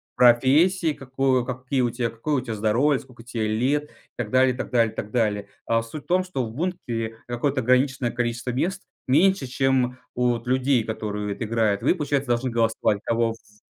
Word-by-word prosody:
профессии 150 +8 +4
какое 135 -2 0
какие 130 +1 -2 0.3
какое 115 +7 -2
у 130 - +1
тебя 120 -3 -5
здоровье, 120 +7 +2
сколько 125 -3 -15
тебе 115 -2 -2
лет 130 +7 +1
и - - -22 0.3
так 120 -3 -3
далее, 130 +2 +4
и - - -10
так - - -4
далее, 115 -3 +2
и - - -21
так 105 - -5
далее. 105 -4 0 0.2
О, 115 0 +2
суть 115 +6 -8
в - - -34
том, 185 +1 +2
что 160 -9 -3
в 110 - -7
бункере 115 -7 -3
какое-то 130 +3 -1
ограниченное 130 0 +2
количество 120 0 -2
мест, 180 +10 -2 0.2
меньше, 170 +3 +3
чем 130 -1 +1 0.2
у 125 0 +1
вот 115 0 -6
людей, 130 -1 +2
которые 105 -2 -3
это 110 - -5
играют. 110 -2 +1
Вы, - - +3
получается, 145 -4 -1
должны 120 +1 0
голосовать, 115 -3 +1
кого 115 0 +1
ф 105 -2 -15
125 Hz, 190 wpm, -24 LUFS, 115-135 Hz, 0.3 s, профессии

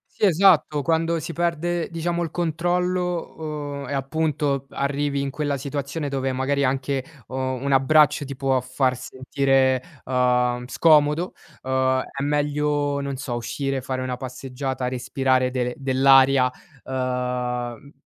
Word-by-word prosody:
Sì, 210 - +3
esatto, 170 -5 +4
quando 165 +1 +1
si 165 +2 -5
perde, 170 0 -1
diciamo, 170 +1 -2
il 165 - -6
controllo, 170 -4 -2
uhm, - - -8
e - - -4
appunto 140 -1 -1
arrivi 140 0 -1
in 140 0 -2
quella 145 0 -2
situazione 140 +2 -4
dove 135 -1 -1
magari 140 +2 0
anche, 135 +1 0 0.3
uhm, 130 +1 -3
un 140 - -1
abbraccio 150 +2 +4
ti 140 0 -6
può 135 -1 +1
far 130 0 0
sentire, 130 0 +1 0.2
uhm, 125 -1 +1
scomodo, 150 +4 +3 0.3
uhm, 130 0 +1
è 140 0 -7
meglio, 145 0 0
non 140 -1 -3
so, 130 -3 -4
uscire, 135 +3 -2
fare 130 0 -3
una 130 -1 -3
passeggiata, 130 0 -4
respirare 130 0 +1
del 125 -1 -1
dell'aria 135 -1 +5 0.3
uhm 125 0 -3
140 Hz, 135 wpm, -23 LUFS, 130-150 Hz, 0.3 s, dell'aria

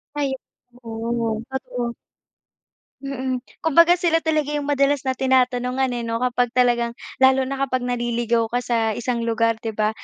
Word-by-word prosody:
Ay. 285 -2 0 0.5
Oo, 225 -1 -2
totoo. 250 -2 -4 1.1
Mm. 260 -2 -3 0.2
Kumbaga 335 +3 +6
sila 335 -2 +2
talaga 305 -2 0
yung 290 -1 -2
madalas 280 0 +2
na 260 -2 -2
tinatanungan, 255 0 +1
eh, 240 -1 -3
'no, 230 +1 -2
kapag 245 -1 0
talagang 240 -2 +2 0.2
lalo 265 0 +5
na 275 - -3
kapag 255 -1 -1
naliligaw 240 -1 0
ka 245 +2 -2
sa 225 -2 0
isang 240 0 -2
lugar, 230 0 +1
di 225 0 -5
ba? 215 0 +1
250 Hz, 150 wpm, -22 LUFS, 235-265 Hz, 1.1 s, Kumbaga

